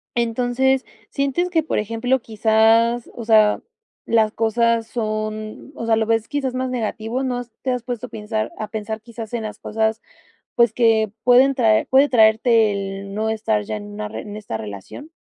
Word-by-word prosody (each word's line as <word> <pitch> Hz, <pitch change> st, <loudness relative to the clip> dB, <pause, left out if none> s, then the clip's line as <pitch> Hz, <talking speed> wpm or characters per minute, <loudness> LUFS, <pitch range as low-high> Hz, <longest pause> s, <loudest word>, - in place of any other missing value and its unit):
Entonces, 245 Hz, +3 st, +1 dB, 0.2 s
sientes 280 Hz, +6 st, -1 dB
que, 325 Hz, -3 st, +1 dB
por 315 Hz, -, -1 dB
ejemplo, 230 Hz, +5 st, 0 dB
quizás, 225 Hz, +2 st, +2 dB
o 230 Hz, -, -7 dB
sea, 215 Hz, -2 st, +4 dB, 0.4 s
las 220 Hz, -2 st, +2 dB
cosas 230 Hz, 0 st, +1 dB
son, 215 Hz, +1 st, -4 dB
o 230 Hz, -, -5 dB
sea, 225 Hz, -1 st, +3 dB
¿lo 220 Hz, 0 st, +1 dB
ves 225 Hz, 0 st, 0 dB
quizás 270 Hz, -3 st, -2 dB
más 255 Hz, 0 st, -2 dB
negativo? 235 Hz, +1 st, -3 dB
¿No 250 Hz, -2 st, -1 dB
has 245 Hz, -2 st, -7 dB
te 260 Hz, -, -1 dB
has 250 Hz, -2 st, -2 dB
puesto 245 Hz, 0 st, -5 dB
a -, -, -22 dB
pensar 215 Hz, 0 st, -3 dB
a 215 Hz, -, -4 dB
pensar 220 Hz, 0 st, -5 dB
quizás 230 Hz, 0 st, -9 dB
en 230 Hz, -2 st, -2 dB
las 215 Hz, -, -7 dB
cosas, 220 Hz, 0 st, -1 dB, 0.5 s
pues 235 Hz, -2 st, +4 dB
que 220 Hz, -3 st, +2 dB
pueden 255 Hz, +2 st, +5 dB
traer 225 Hz, -4 st, +3 dB
puede 275 Hz, +2 st, +5 dB
traerte 220 Hz, -1 st, +4 dB
el 195 Hz, 0 st, -5 dB
no 220 Hz, +1 st, -1 dB
estar 220 Hz, -1 st, 0 dB
ya 215 Hz, 0 st, -4 dB
en 205 Hz, -, -7 dB
una 210 Hz, +1 st, -5 dB
en 210 Hz, -1 st, -7 dB
esta 160 Hz, -, -5 dB
relación? 105 Hz, -, -9 dB
225 Hz, 180 wpm, -21 LUFS, 215-245 Hz, 0.5 s, pueden